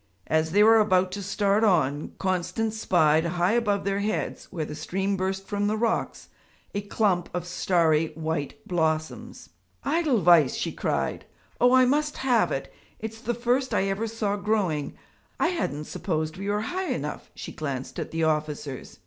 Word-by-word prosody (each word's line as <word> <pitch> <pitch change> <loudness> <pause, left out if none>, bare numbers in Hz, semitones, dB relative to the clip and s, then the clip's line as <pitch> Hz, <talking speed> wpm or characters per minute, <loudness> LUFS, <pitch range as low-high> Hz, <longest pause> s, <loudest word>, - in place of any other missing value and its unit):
As 160 0 +1
they 205 +5 +4
were 225 +1 +7
about 185 -3 +3
to 200 - -4
start 200 +2 +1
on, 155 -8 +2
Constance 190 +4 -1
spied 160 -5 +3
high 175 +2 +1
above 210 -4 +1
their 195 0 0
heads, 210 +1 -2
where 165 -5 -3
the 150 - -7
stream 190 +6 -2
burst 190 +1 -2
from 205 0 -1
the 215 +1 0
rocks, 230 +1 -1 0.4
a 200 - -1
clump 200 -3 0
of 180 -1 -2
starry 165 -3 +2
white 160 -2 -4
blossoms. 160 -3 -2 0.4
'Edelweiss!' 215 - +4
she - - -2
cried. - - -2 0.3
'Oh, 245 +1 +5
I 255 0 +6
must 295 +3 +1
have 250 -4 +2
it - - -4 0.2
it's 220 0 -7
the 240 -1 -2
first 250 +3 0
I - - +2
ever 205 +4 -1
saw 215 -2 -2
growing; 200 -8 -1 0.4
I 335 - +3
hadn't 315 - -2
supposed 155 -1 -3
we 195 +2 -4
were 205 +1 0
high 370 - -3
enough.' - - -4
She - - -7
glanced 135 -4 -5
at - - -4
the 165 0 -2
officers. 150 -3 -2
195 Hz, 165 wpm, -26 LUFS, 160-220 Hz, 0.4 s, were